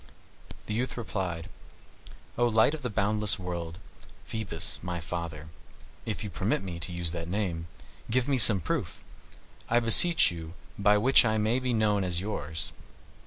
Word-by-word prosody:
The 105 - -4
youth 125 +4 -2
replied, 90 -8 -4 0.9
"O 120 0 +2
light 110 +5 +3
of 155 - -6
the 125 - -3
boundless 105 0 +2
world, 85 -3 -6 0.5
Phoebus, 110 -7 -1
my 90 -1 -4
father, 80 -2 -6 0.6
if 110 -2 -3
you 105 - -6
permit 80 +4 -1
me 90 -3 -6
to 85 +2 -4
use 85 -1 0
that 85 -1 -5
name, 90 -4 -3 0.4
give 125 +2 +1
me 135 -2 +1
some 105 -4 +6
proof, - - -4 0.7
I 120 - +4
beseech 120 - +6
you, 85 0 -8 0.2
by 105 +1 +3
which 130 +7 +5
I 110 -2 +1
may 110 +4 +1
be 130 -1 -2
known 105 -2 +1
as 90 -2 -1
yours." 80 -6 -4
100 Hz, 160 wpm, -28 LUFS, 85-110 Hz, 0.9 s, some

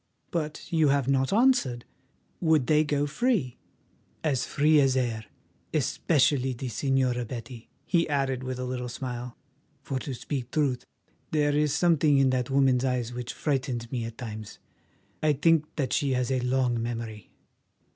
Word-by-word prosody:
But 155 0 -4
you 160 -2 +4
have 140 -2 +2
not 135 -1 +2
answered. 210 - +2 0.5
Would 160 -6 +3
they 155 +3 +4
go 145 -1 0
free?" 150 - 0 0.6
"As 140 -5 0
free 150 +1 +4
as 135 -1 +3
air—especially 130 +3 -1
the 125 +1 -5
Señora 130 -2 0
Betty," 120 0 -8 0.2
he 170 -3 +1
added 135 -3 0
with 130 -1 -4
a 125 - -4
little 125 -1 -4
smile, 125 -1 -6 0.5
"for 135 - -3
to 130 0 -5
speak 130 0 -4
truth, 140 -4 0 0.4
there 145 -2 +1
is 150 -1 +2
something 155 -4 +3
in 135 -1 +4
that 125 -1 -1
woman's 135 -2 +3
eyes 125 -2 -1
which 125 0 -5
frightens 130 -5 -2
me 120 -3 -2
at 115 0 -8
times. 110 -3 -7 0.6
I 155 -1 +3
think 155 +2 +3
that 135 -4 -1
she 140 -2 +1
has 125 0 0
a 130 - +1
long 125 -1 +1
memory. 115 -3 -5
130 Hz, 155 wpm, -27 LUFS, 125-145 Hz, 0.6 s, you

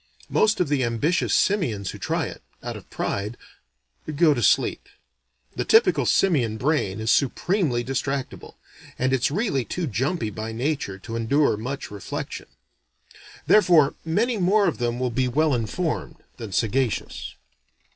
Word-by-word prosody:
Most 215 0 +3
of 180 - +2
the 140 -2 +1
ambitious 120 +9 0
simians 120 - +1
who - - -10
try - - -1
it - - -8 0.2
out - - -4
of - - -11
pride 105 +4 -3 0.8
go 155 0 +5
to 120 - -2
sleep. - - +2 0.7
The - - -1
typical 445 +2 +4
simian 130 - +2
brain 125 -7 0
is 110 +1 +1
supremely 140 - +1
distractable, 135 +1 -4 0.4
and 130 +1 +1
it's 130 -2 +2
really 155 - 0
too 180 +8 -3
jumpy 130 - -1
by 110 +2 -5
nature 125 -5 -2
to 115 +4 -8
endure 125 +4 +2
much 125 +5 -5
reflection. 100 -2 -6 1.0
Therefore 170 -8 +5
many 220 +9 0
more 195 +3 +3
of 165 - -1
them 120 0 -1
will 125 -1 -1
be 125 +2 0
well 150 +4 +2
informed 130 +8 -2 0.2
than 115 -4 -7
sagacious. 115 +5 -1
135 Hz, 145 wpm, -24 LUFS, 115-165 Hz, 1.0 s, go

